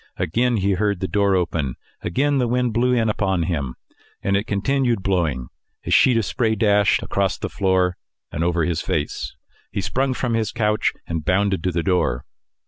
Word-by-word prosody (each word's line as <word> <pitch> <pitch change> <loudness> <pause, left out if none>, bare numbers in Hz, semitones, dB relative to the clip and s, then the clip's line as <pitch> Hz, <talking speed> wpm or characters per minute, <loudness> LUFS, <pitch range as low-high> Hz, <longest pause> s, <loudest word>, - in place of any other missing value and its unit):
Again 120 +7 +1
he 100 0 +1
heard 100 0 0
the 95 - -2
door 100 -1 +2
open; 80 -7 -1 0.3
again 140 +9 +1
the 125 - +1
wind 125 -1 0
blew 125 +3 +2
in 115 -3 +2
upon 95 -4 0
him, 70 -7 -2 0.5
and 100 - +1
it 100 +2 0
continued 120 +1 0
blowing; 80 -10 0 0.4
a - - -3
sheet 125 -3 +5
of 115 - +1
spray 110 +3 0
dashed 105 -1 +3
across 100 -1 0
the - - -4
floor, 95 -2 +1 0.3
and 80 - -2
over 85 -1 +1
his 85 -2 -1
face. 75 -1 -3 0.4
He - - -2
sprung 130 +5 0
from 125 -2 -1
his 110 -2 0
couch 105 -3 +1
and 80 -2 -3
bounded 95 +1 +1
to 90 - +2
the 85 -1 -1
door. 90 -10 0
100 Hz, 185 wpm, -22 LUFS, 90-115 Hz, 0.5 s, sheet